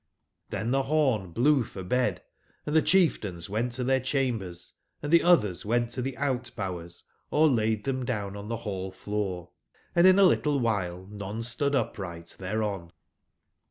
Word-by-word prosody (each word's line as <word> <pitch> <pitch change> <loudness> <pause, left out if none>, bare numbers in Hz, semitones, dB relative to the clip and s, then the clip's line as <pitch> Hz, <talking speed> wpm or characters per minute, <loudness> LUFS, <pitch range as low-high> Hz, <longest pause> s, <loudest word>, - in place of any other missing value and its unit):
Chen 115 +2 -2
the 135 +1 +3
horn 135 - +1
blew 130 - +3
for 95 -3 -8
bed, 105 -2 0 0.4
and 150 - -2
the 160 - +6
chief 185 -1 +3
tains 90 -3 -6
went 115 +4 -1
to 125 +1 -3
their 130 +1 +2
chambers, 120 -10 -2 0.3
and 145 +2 -2
the 170 - +7
others 105 - +3
went 120 +2 0
to 130 - -3
the 130 +1 -4
out/bowers 100 -11 -3 0.3
or 155 +1 +4
laid 110 -5 +1
them 130 -1 -1
down 105 -5 -3
on 100 0 -7
the 115 +1 -2
hall/floor, 95 -2 -4 0.4
and 175 +1 +7
in 185 0 +7
a 200 - +7
little 150 -5 +3
while 95 -6 -1
none 105 +2 -5
stood 140 +5 0
up 130 - -1
right 85 -3 -7
thereon. 95 -3 -3
115 Hz, 165 wpm, -28 LUFS, 95-135 Hz, 0.4 s, the